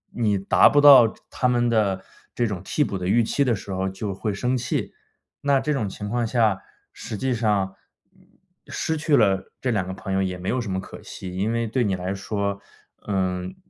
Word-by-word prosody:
你 105 Hz, -4 st, +1 dB
达 95 Hz, -, +5 dB
不 145 Hz, -, +3 dB
到 135 Hz, -6 st, +9 dB, 0.2 s
他 125 Hz, -, 0 dB
们 120 Hz, -1 st, +2 dB
的 100 Hz, -5 st, +1 dB, 0.3 s
这 120 Hz, -, +1 dB
种 100 Hz, -6 st, -3 dB
替 150 Hz, -, 0 dB
补 100 Hz, -, -3 dB
的 90 Hz, -, -3 dB
预 115 Hz, +5 st, +3 dB
期 140 Hz, +5 st, +1 dB
的 125 Hz, -4 st, +1 dB
时 100 Hz, 0 st, -8 dB
候 95 Hz, 0 st, -1 dB
就 95 Hz, +1 st, -4 dB
会 105 Hz, +3 st, -3 dB
生 125 Hz, +5 st, -1 dB
气， 120 Hz, -, -3 dB, 0.5 s
那 140 Hz, -1 st, +3 dB
这 150 Hz, +3 st, -1 dB
种 110 Hz, -8 st, -1 dB
情 105 Hz, +2 st, -7 dB
况 120 Hz, +1 st, 0 dB
下， 110 Hz, -5 st, +2 dB, 0.3 s
实 110 Hz, -, -7 dB
际 130 Hz, +3 st, 0 dB
上， 105 Hz, -5 st, 0 dB, 0.4 s
嗯， -, -, -25 dB, 0.4 s
失 160 Hz, -, -2 dB
去 150 Hz, -1 st, +2 dB
了 95 Hz, -4 st, +2 dB
这 130 Hz, -, 0 dB
两 95 Hz, -5 st, -1 dB
个 95 Hz, -, -4 dB
朋 95 Hz, 0 st, -5 dB
友 95 Hz, -, +1 dB
也 90 Hz, -1 st, -2 dB
没 90 Hz, +1 st, -7 dB
有 130 Hz, -, 0 dB
什 110 Hz, -4 st, -5 dB
么 95 Hz, -, -1 dB
可 95 Hz, -, -10 dB
惜。 90 Hz, -1 st, -8 dB
因 100 Hz, +4 st, 0 dB
为 115 Hz, 0 st, 0 dB
对 125 Hz, +3 st, 0 dB
你 100 Hz, -4 st, 0 dB
来 90 Hz, +1 st, -3 dB
说， 100 Hz, 0 st, -3 dB, 0.5 s
嗯， 95 Hz, -2 st, -2 dB
105 Hz, 230 characters per minute, -24 LUFS, 95-120 Hz, 0.5 s, 到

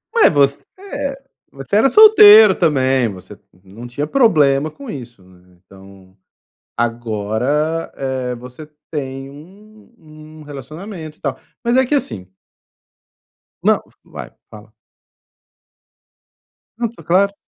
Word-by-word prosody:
Ué, 455 Hz, -, +6 dB
você 140 Hz, -2 st, +1 dB, 0.2 s
é 285 Hz, -8 st, -5 dB, 0.3 s
você 135 Hz, +8 st, -5 dB
era 230 Hz, +5 st, +4 dB
solteiro 220 Hz, -, +8 dB
também, 130 Hz, -7 st, +1 dB
você 95 Hz, +1 st, -12 dB, 0.3 s
não 100 Hz, +4 st, -15 dB
não 120 Hz, -, -7 dB
tinha 135 Hz, +5 st, -4 dB
problema 150 Hz, -, +2 dB
com 275 Hz, -, -13 dB
isso, 120 Hz, -, -10 dB
né, 90 Hz, 0 st, -23 dB
então 95 Hz, -1 st, -18 dB, 0.6 s
agora, 120 Hz, +7 st, -2 dB
eh, 130 Hz, -2 st, -4 dB
você 125 Hz, +5 st, -12 dB, 0.2 s
tem 135 Hz, -3 st, -6 dB
um 205 Hz, +10 st, -17 dB
um 155 Hz, -3 st, -15 dB
relacionamento 155 Hz, -, -10 dB
e -, -, -37 dB
tal, 140 Hz, -3 st, -4 dB, 0.2 s
mas 240 Hz, +1 st, +1 dB
é 260 Hz, -, +3 dB
que 290 Hz, -, 0 dB
assim 110 Hz, -, -4 dB, 1.4 s
Não. -, -, +2 dB, 0.2 s
Vai, -, -, -10 dB, 0.2 s
fala. 110 Hz, 0 st, -15 dB, 2.1 s
Não, 235 Hz, -, 0 dB
tá 235 Hz, -, -16 dB
claro. 195 Hz, +3 st, +2 dB
145 Hz, 120 wpm, -17 LUFS, 120-200 Hz, 2.1 s, solteiro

